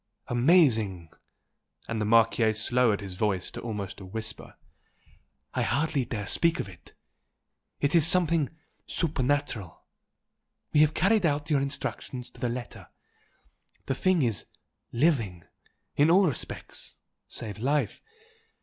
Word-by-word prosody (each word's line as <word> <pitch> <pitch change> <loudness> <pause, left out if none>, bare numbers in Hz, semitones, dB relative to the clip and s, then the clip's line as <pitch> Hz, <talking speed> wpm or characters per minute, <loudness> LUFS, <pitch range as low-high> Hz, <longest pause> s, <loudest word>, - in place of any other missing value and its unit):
"Amazing!" 120 - +3 0.8
and 115 -1 -2
the - - 0
Marchese 110 0 +3
lowered 120 -5 +3
his 95 -2 -6
voice 95 -1 -1
to - - -7
almost 105 -4 -5
a - - -8
whisper 110 +3 -6 1.0
"I - - 0
hardly 140 -3 0
dare 105 -3 -4
speak 170 - +1
of - - -3
it! 90 -3 -15 0.9
it 145 0 +1
is 165 -4 +8
like - - +4
something 165 -5 +2 0.4
supernatural! 145 - -1 0.9
We 150 - +4
have 155 0 +4
carried 210 +1 +3
out 145 +1 -2
your 140 -2 +3
instructions 135 -2 -4
to - - -17
the 125 - 0
letter 120 0 -7 1.0
the - - -1
thing 180 +2 +2
is 115 -4 -1 0.4
LIVING, 115 - +1 0.5
in 145 +3 +4
all 190 +3 +6
respects 140 - -5 0.3
save 105 -3 -5
life. 135 -1 0
125 Hz, 130 wpm, -27 LUFS, 110-150 Hz, 1.0 s, is